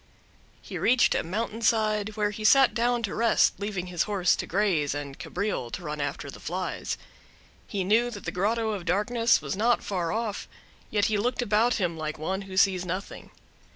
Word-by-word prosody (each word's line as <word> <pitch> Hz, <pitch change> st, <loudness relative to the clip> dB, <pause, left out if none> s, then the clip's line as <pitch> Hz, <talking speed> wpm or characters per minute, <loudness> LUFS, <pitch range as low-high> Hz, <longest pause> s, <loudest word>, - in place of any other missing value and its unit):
He -, -, -6 dB
reached 250 Hz, +1 st, +4 dB
a -, -, +1 dB
mountain 220 Hz, +6 st, -3 dB
side, 215 Hz, -2 st, +1 dB
where 210 Hz, -1 st, +1 dB
he 215 Hz, +1 st, -7 dB
sat 270 Hz, +4 st, +6 dB
down 240 Hz, 0 st, +1 dB
to 200 Hz, -, -2 dB
rest, 230 Hz, 0 st, +3 dB
leaving 200 Hz, -3 st, -3 dB
his 180 Hz, -2 st, -3 dB
horse 190 Hz, -3 st, +3 dB
to -, -, -4 dB
graze, 170 Hz, -8 st, +1 dB
and 140 Hz, -1 st, -6 dB
Cabriole 200 Hz, -, -3 dB
to 180 Hz, -, -5 dB
run 150 Hz, -2 st, -4 dB
after 145 Hz, 0 st, -4 dB
the -, -, -11 dB
flies. 180 Hz, +2 st, -3 dB, 0.7 s
He 195 Hz, -3 st, -2 dB
knew 225 Hz, +6 st, +3 dB
that 205 Hz, -5 st, -9 dB
the -, -, -2 dB
Grotto 220 Hz, +4 st, 0 dB
of 195 Hz, -5 st, -4 dB
Darkness 230 Hz, +6 st, +2 dB
was -, -, -3 dB
not 235 Hz, +4 st, +2 dB
far 180 Hz, -4 st, -2 dB
off, 220 Hz, -2 st, -3 dB, 0.4 s
yet 205 Hz, -1 st, +1 dB
he 215 Hz, -2 st, +1 dB
looked 245 Hz, +3 st, 0 dB
about 225 Hz, +2 st, +2 dB
him 175 Hz, -5 st, -1 dB
like 155 Hz, 0 st, -3 dB
one 190 Hz, +5 st, -2 dB
who 190 Hz, -, -6 dB
sees 190 Hz, -2 st, +4 dB
nothing. 185 Hz, +2 st, -5 dB
205 Hz, 190 wpm, -27 LUFS, 180-225 Hz, 0.7 s, sat